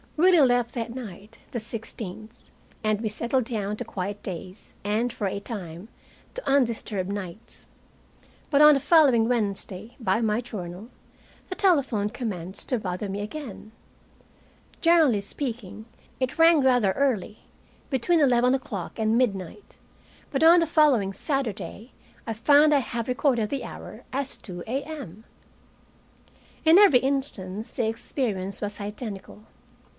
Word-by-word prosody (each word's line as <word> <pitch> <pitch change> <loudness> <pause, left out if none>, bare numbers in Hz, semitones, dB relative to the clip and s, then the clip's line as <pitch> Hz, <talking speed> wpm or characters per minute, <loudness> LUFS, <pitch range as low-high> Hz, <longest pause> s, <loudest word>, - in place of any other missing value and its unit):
Willie 355 +1 +6
left 245 -3 +3
that 230 -1 -4
night, 215 -3 -9
the 240 - -3
16th, 220 0 -9 0.3
and 215 -1 +1
we 220 - -1
settled 235 +4 0
down 210 -3 -3
to - - -5
quiet 200 +2 -5
days, 185 +1 -8
and, 220 +4 0
for 230 -4 -3
a 195 - -3
time, 195 -3 -7 0.5
to - - -6
undisturbed 230 -8 0
nights. 200 +1 -8 0.8
But 285 -1 +4
on 300 0 +9
the - - +2
following 270 -8 +5
Wednesday, 210 -2 -2
by 230 -1 +1
my 220 0 +1
journal, 200 -3 -7 0.6
the 370 - -4
telephone 275 - +2
commenced 205 -7 -2
to 250 - +1
bother 185 0 -4
me 200 +1 -3
again. 215 -2 -7 1.1
Generally 320 -11 +4
speaking, 220 -3 -6 0.3
it 255 0 -2
rang 330 -2 +6
rather 245 -7 +3
early, 230 -6 -1 0.5
between 310 +6 +2
eleven 250 -2 +4
o'clock 210 -9 -6
and 220 0 +2
midnight. 200 - -2 0.5
But 275 +2 0
on 335 +2 +8
the 330 - +1
following 275 -12 +3
Saturday 220 - -3
night 230 +5 -16 0.4
I 225 - -1
find 290 +7 +5
I 285 - +5
have 235 -3 -4
recorded 250 -4 +1
the 275 -2 -3
hour - - -9
as 275 0 -2
2 175 -3 -8
a.m. 260 - -6 1.4
In 320 +2 +7
every 390 -12 +7
instance 230 -7 -2
the 235 - -1
experience 220 -4 -3
was 205 0 -4
identical. 210 0 -7
230 Hz, 140 wpm, -25 LUFS, 205-270 Hz, 1.4 s, on